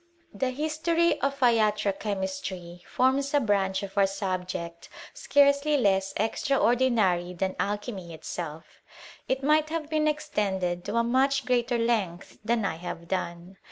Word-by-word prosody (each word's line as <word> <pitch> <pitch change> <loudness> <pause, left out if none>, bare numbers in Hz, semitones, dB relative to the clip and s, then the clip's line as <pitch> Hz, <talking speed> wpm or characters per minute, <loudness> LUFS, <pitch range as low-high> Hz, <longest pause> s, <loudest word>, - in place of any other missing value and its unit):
The 255 +6 -1
history 315 +5 0
of 275 0 -1
latro 215 -4 +3
chemistry 190 -3 -4
forms 275 +3 +1
a - - +6
branch 200 -5 0
our 200 -1 +4
subject 185 -3 -4 0.2
scarcely 280 +1 +3
less 195 -5 +2
extraordinary 225 -6 +1
than 190 +2 -1
Alchyn 205 +1 -2
itself. 160 -1 -7 0.5
It 265 +1 0
might 305 +2 +3
have 320 -1 -4
been 310 -1 +2
extended 195 - -1
to 205 - -3
a 235 - +3
much 270 +3 +2
great 245 -1 +1
length 230 -8 -1
than 225 -1 +1
I 160 - -2
have 170 0 -7
done. 175 0 -4
215 Hz, 130 wpm, -27 LUFS, 190-275 Hz, 0.5 s, a